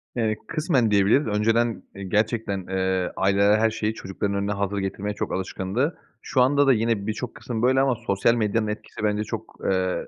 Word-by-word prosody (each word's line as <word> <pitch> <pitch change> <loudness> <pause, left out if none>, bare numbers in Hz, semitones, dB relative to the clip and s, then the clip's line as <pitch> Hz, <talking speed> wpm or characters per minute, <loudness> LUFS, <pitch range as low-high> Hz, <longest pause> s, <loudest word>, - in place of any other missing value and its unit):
Eee, 110 -3 +1
kısmen 150 - +1
diyebiliriz. 100 +8 +4
Önceden, 115 +2 +1
eee, 100 - -7
gerçekten, 105 -1 -1
eee, 95 -1 0
aileler 100 +2 +3
her 115 0 +3
şeyi 110 0 -2
çocukların 100 0 -3
önüne 100 +1 -1
hazır 100 0 -2
getirmeye 100 +2 -3
çok - - -3
alışkındı. 95 - -2 0.2
Şu 130 - +1
anda 140 +2 +4
da 135 - +7
yine 110 -2 0
birçok 115 +3 -4
kısım 115 -2 -4
böyle 130 +2 +3
ama 135 -2 +3
sosyal 115 0 +1
medyanın 110 -1 0
etkisi 105 +1 -6
bence 105 0 +1
çok, 110 +1 -7
eee, 95 -1 0
105 Hz, 180 wpm, -24 LUFS, 100-115 Hz, 0.2 s, da